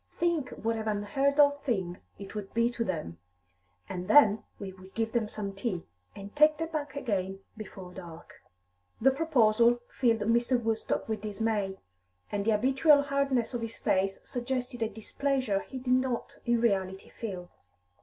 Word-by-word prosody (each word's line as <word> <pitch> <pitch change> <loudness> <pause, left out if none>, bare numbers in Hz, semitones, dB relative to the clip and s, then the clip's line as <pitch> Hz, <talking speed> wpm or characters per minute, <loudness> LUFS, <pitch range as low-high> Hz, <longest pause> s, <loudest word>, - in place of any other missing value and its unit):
Think 335 -6 +1
what 225 0 -2
an 220 0 -4
unheard 245 +8 0
of 285 0 +5
thing 190 -9 -2 0.2
it 200 - -9
would 210 -1 -6
be 235 +1 +3
to 235 -1 -2
them! 155 - -4 0.7
And 180 - -5
then 215 -3 +6
we 195 -2 -7
would 190 0 -15
give 225 0 -1
them 230 -2 0
some 205 -2 -5
tea, 195 -3 -3 0.3
and 200 0 -9
take 305 +1 +6
them 325 +1 -3
back 295 -3 -4
again 195 -7 -2
before 190 -4 -9
dark." 170 -3 -11 0.6
The 270 +4 +5
proposal 240 -6 +4
filled 230 -4 +2
Mr. 235 +3 +2
Woodstock 225 -1 -1
with 220 -2 -2
dismay, 210 -2 -1 0.5
and 200 -1 -1
the 225 - +3
habitual 270 +6 +4
hardness 275 -4 0
of 240 - -2
his 230 0 -5
face 195 0 +1
suggested 250 0 -3
a 225 - +1
displeasure 245 0 -1
he 265 - -7
did 255 0 0
not 255 -2 0
in 235 0 +3
reality 190 -4 0
feel. 185 -6 -6
225 Hz, 165 wpm, -29 LUFS, 200-260 Hz, 0.7 s, then